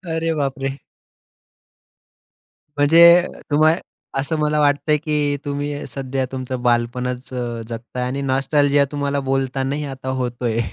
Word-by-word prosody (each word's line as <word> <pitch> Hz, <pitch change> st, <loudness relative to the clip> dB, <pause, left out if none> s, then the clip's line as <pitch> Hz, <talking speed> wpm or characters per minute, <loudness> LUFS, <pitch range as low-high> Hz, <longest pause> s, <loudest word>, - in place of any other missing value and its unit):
अरे 165 Hz, 0 st, 0 dB
बापरे! 135 Hz, -1 st, -2 dB, 2.0 s
म्हणजे, 170 Hz, +4 st, +7 dB, 0.2 s
तुम्हाला 155 Hz, +3 st, +4 dB, 0.4 s
असं 140 Hz, +4 st, -1 dB
मला 150 Hz, 0 st, +1 dB
वाटतंय, 145 Hz, +1 st, +3 dB
की 150 Hz, -1 st, 0 dB
तुम्ही 145 Hz, 0 st, -3 dB
सध्या 135 Hz, -1 st, -2 dB
तुमचं 130 Hz, -1 st, -4 dB
बालपणच 125 Hz, +1 st, -1 dB
अ, 120 Hz, -2 st, -4 dB
जगताय 120 Hz, +2 st, -5 dB
आणि 135 Hz, +2 st, -3 dB
नॉस्टॅल्जिया 140 Hz, +1 st, +2 dB
तुम्हाला 145 Hz, -1 st, -1 dB
बोलतानाही 135 Hz, +1 st, -1 dB
आता 130 Hz, 0 st, -8 dB
होतोय. 120 Hz, -2 st, -2 dB
140 Hz, 110 wpm, -20 LUFS, 130-145 Hz, 2.0 s, म्हणजे